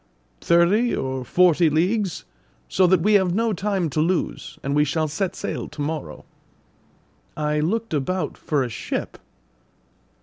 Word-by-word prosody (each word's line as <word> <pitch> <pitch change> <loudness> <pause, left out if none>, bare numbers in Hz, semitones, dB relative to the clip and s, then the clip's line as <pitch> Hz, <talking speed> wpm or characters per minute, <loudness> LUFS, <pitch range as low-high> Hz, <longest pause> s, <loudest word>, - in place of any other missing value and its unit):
"Thirty 180 +8 +3
or 130 -1 -3
forty 175 +2 +4
leagues; 185 +5 0 0.4
so 185 -1 +3
that 180 -1 +3
we 210 +5 +3
have 190 -3 +3
no 225 0 +1
time 195 -2 -1
to 155 - 0
lose, 175 +2 -2
and 140 - -1
we 150 - +4
shall 155 +2 0
set 180 +5 -2
sail - - -4
to - - -14
morrow." 145 - -4 1.1
I 150 0 0
looked 215 +7 -1
about 155 +3 -1
for 145 -3 -1
a - - -2
ship. 110 - -5
170 Hz, 145 wpm, -23 LUFS, 150-190 Hz, 1.1 s, forty